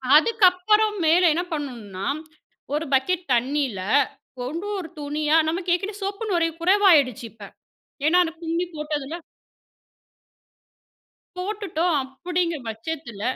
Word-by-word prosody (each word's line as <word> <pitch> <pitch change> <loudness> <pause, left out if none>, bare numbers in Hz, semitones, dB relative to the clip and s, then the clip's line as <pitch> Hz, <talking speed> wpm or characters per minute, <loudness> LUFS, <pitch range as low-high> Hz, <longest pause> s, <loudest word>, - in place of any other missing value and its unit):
அதுக்கு 440 +7 +4
அப்பறம் 425 +3 +2
மேல 340 +3 +5
என்ன 345 +3 -1
பண்ணனும்னா, 225 -10 -5 0.7
ஒரு 305 +2 -1
பக்கெட் 350 +7 +2
தண்ணில, 255 -3 0 0.7
ஒண்டொரு 355 +4 -4
துணியா 300 +2 +1
நமக்கு 350 +2 -2
ஏற்கனவே 400 +3 -5
சோப்பு 400 +3 -3
நுரை 335 -2 +2
குறைவாயிடுச்சு 335 - +4
இப்ப. 215 -1 -14 0.6
ஏன்னா 355 +3 +5
அத 325 - -3
கும்மி 335 +2 -1
போட்டதுல. 300 -1 -4 2.2
போட்டுட்டோம், 365 -4 -1 0.3
அப்டிங்கற 345 -4 0
பட்சத்துல 230 -1 -6
325 Hz, 105 wpm, -24 LUFS, 285-365 Hz, 2.2 s, மேல